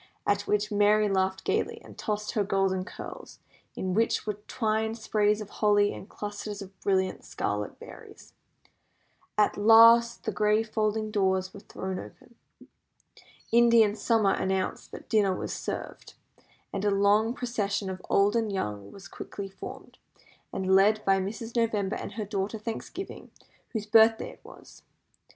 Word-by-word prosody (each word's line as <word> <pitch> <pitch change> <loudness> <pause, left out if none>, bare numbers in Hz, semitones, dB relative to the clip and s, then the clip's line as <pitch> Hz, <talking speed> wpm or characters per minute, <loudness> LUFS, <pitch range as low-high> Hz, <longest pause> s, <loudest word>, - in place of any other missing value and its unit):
At 205 0 0
which 210 0 0
Merry 210 +1 +4
laughed 190 -1 0
gaily, - - -1
and - - -13
tossed 210 -1 -3
her 210 - +1
golden 190 -1 0
curls, - - -9 0.4
in 185 -1 -2
which 225 +4 +1
were 210 - -1
twined 220 -1 -1
sprays 210 -1 +1
of 205 - -8
holly 205 -1 +4
and 200 - -10
clusters 205 0 -6
of 195 -1 -10
brilliant 190 -1 0
scarlet 105 0 -3
berries. - - -13 1.0
At 210 - +3
last 230 +2 +6
the 220 - -2
great 210 +1 +2
folding 215 0 0
doors 190 -2 0
were - - -9
thrown 190 -1 -6
open. 240 - -13 1.2
Indian 230 -2 +5
summer 215 -2 +2
announced 190 0 -2
that - - -10
dinner 200 -4 +2
was - - -4
served, - - -6 0.6
and 195 - -3
a 205 - +3
long 205 +4 +3
procession 205 -5 -2
of 185 -1 -5
old 200 +2 +3
and 225 -2 0
young 105 - -4
was 195 -2 -12
quickly 200 -1 -7
formed, 190 0 -10 0.5
and 190 0 0
led 210 +2 +4
by 195 0 +4
Mrs. 225 +5 -5
November 220 -3 0
and - - -6
her 215 0 -4
daughter 200 +1 -3
Thanksgiving, 230 - -7 0.4
whose 220 -3 -4
birthday 225 +1 +4
it - - -18
was. - - -15
205 Hz, 150 wpm, -28 LUFS, 195-220 Hz, 1.2 s, last